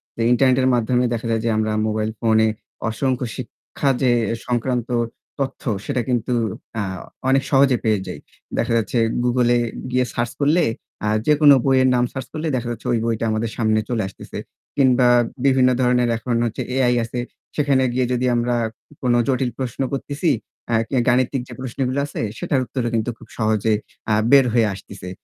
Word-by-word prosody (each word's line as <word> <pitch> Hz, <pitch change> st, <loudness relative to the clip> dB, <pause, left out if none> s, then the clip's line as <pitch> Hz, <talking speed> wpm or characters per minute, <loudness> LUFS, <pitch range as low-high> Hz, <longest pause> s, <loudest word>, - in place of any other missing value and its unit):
তো -, -, -16 dB
ইন্টারনেটের 130 Hz, +1 st, +4 dB
মাধ্যমে 125 Hz, +1 st, +2 dB
দেখা 115 Hz, 0 st, -3 dB
যায় 110 Hz, -1 st, +1 dB
যে 115 Hz, -, +2 dB
আমরা 110 Hz, 0 st, 0 dB, 0.2 s
মোবাইল 110 Hz, 0 st, -1 dB
ফোনে 110 Hz, -1 st, +3 dB, 0.4 s
অসংখ্য 130 Hz, +2 st, -1 dB
শিক্ষা 130 Hz, +2 st, -4 dB
যে 130 Hz, -2 st, +4 dB, 0.4 s
সংক্রান্ত 125 Hz, 0 st, -1 dB, 0.5 s
তথ্য 135 Hz, -1 st, -3 dB, 0.2 s
সেটা 130 Hz, -4 st, -1 dB
কিন্তু, 125 Hz, 0 st, 0 dB, 0.4 s
হ্যাঁ, 100 Hz, -4 st, -3 dB, 0.3 s
অনেক 135 Hz, +1 st, +3 dB
সহজে 135 Hz, -2 st, +5 dB
পেয়ে 110 Hz, -2 st, +2 dB
যাই। -, -, -6 dB, 0.4 s
দেখা -, -, 0 dB
যাচ্ছে 115 Hz, +2 st, -1 dB, 0.3 s
Google 125 Hz, 0 st, +2 dB
এ -, -, +2 dB, 0.3 s
গিয়ে 125 Hz, 0 st, +2 dB
সার্চ 120 Hz, -1 st, -1 dB
করলে 155 Hz, +5 st, +4 dB, 0.4 s
আ -, -, +1 dB, 0.2 s
যেকোনো 150 Hz, -1 st, +7 dB
বইয়ের 130 Hz, -1 st, +4 dB
নাম 120 Hz, -, +3 dB
সার্চ 130 Hz, -, -5 dB
করলে 155 Hz, +1 st, -3 dB
দেখা 120 Hz, -1 st, -2 dB
যাচ্ছে 120 Hz, -, -8 dB
ঐ -, -, +2 dB
বইটা 115 Hz, -1 st, -1 dB
আমাদের 110 Hz, +1 st, -1 dB
সামনে 110 Hz, -2 st, +2 dB
চলে 115 Hz, -4 st, 0 dB
আসতেছে। 95 Hz, -, -10 dB, 0.4 s
কিংবা 130 Hz, -2 st, +4 dB, 0.4 s
বিভিন্ন 130 Hz, -2 st, +5 dB
ধরনের 125 Hz, -1 st, +3 dB
এখন 120 Hz, +1 st, -2 dB
হচ্ছে 115 Hz, -, -3 dB
AI 125 Hz, -2 st, +3 dB
আছে। 120 Hz, +2 st, -4 dB, 0.4 s
সেখানে 140 Hz, -3 st, +2 dB
গিয়ে 130 Hz, 0 st, +1 dB
যদি 125 Hz, +1 st, 0 dB
আমরা 120 Hz, +1 st, +1 dB, 0.5 s
কোনো 125 Hz, -2 st, +2 dB
জটিল 130 Hz, -1 st, +1 dB
প্রশ্ন 130 Hz, -1 st, -3 dB
করতেছি 145 Hz, +4 st, -1 dB, 0.4 s
আ -, -, +1 dB, 0.4 s
গাণিতিক 125 Hz, +2 st, +2 dB
যে -, -, -9 dB
প্রশ্নগুলো 130 Hz, +1 st, -2 dB
আছে 145 Hz, -, -5 dB, 0.2 s
সেটার 135 Hz, -, 0 dB
উত্তরও 120 Hz, 0 st, -2 dB
কিন্তু 115 Hz, +1 st, 0 dB
খুব -, -, -15 dB
সহজে 110 Hz, -1 st, +1 dB, 0.4 s
আ -, -, +4 dB, 0.2 s
বের 140 Hz, -2 st, +7 dB
হয়ে 115 Hz, -2 st, +4 dB
আসতেছে। 95 Hz, -1 st, -9 dB
125 Hz, 170 wpm, -21 LUFS, 115-130 Hz, 0.5 s, যেকোনো